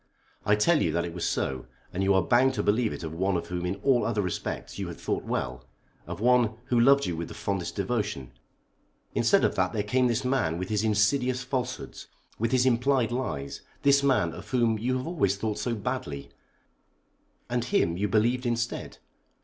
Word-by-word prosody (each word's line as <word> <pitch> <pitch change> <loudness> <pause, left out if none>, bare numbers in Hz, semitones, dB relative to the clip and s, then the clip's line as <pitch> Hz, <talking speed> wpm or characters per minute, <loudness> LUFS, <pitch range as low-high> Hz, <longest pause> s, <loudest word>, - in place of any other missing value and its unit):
"I 105 - +5
tell 150 +10 +3
you - - +1
that 85 0 0
it 85 - -6
was 85 - -1
so, 65 -2 -2 0.3
and 90 - -2
you 95 0 +3
are 95 - +3
bound 130 +1 +3
to - - -1
believe 110 +2 +2
it - - -6
of 80 -1 -5
one 95 +2 0
of - - -6
whom 90 0 -2
in 90 - -1
all 130 -3 +3
other 110 -3 0
respects 90 - -4
you - - -3
had - - -7
thought - - -2
well; 65 0 -3 0.4
of - - -6
one 120 -1 +3
who 120 - +3
loved 140 +3 +5
you 90 - -2
with 85 +1 -4
the - - -10
fondest 95 -3 -3
devotion. 100 - -2 0.8
Instead - - +3
of - - +2
that 90 0 0
there 105 - 0
came 125 +4 +2
this 120 +2 -1
man 125 -12 +1
with 95 +1 -4
his 105 -1 0
insidious 125 +5 +2
falsehoods, 125 -1 -4 0.3
with 115 +1 0
his 130 -1 +3
implied 125 -1 +2
lies; 95 - -3 0.2
this 140 0 +5
man, 130 -12 +2
of - - -10
whom 115 -4 +2
you 130 +3 0
have 130 - -4
always 135 - +1
thought 105 +1 -3
so 120 -2 -1
badly; 105 - -4 1.2
and 120 -1 -1
him 85 -8 +1
you 100 +4 0
believed 120 +5 +1
instead! 120 0 -2
110 Hz, 200 wpm, -27 LUFS, 95-125 Hz, 1.2 s, I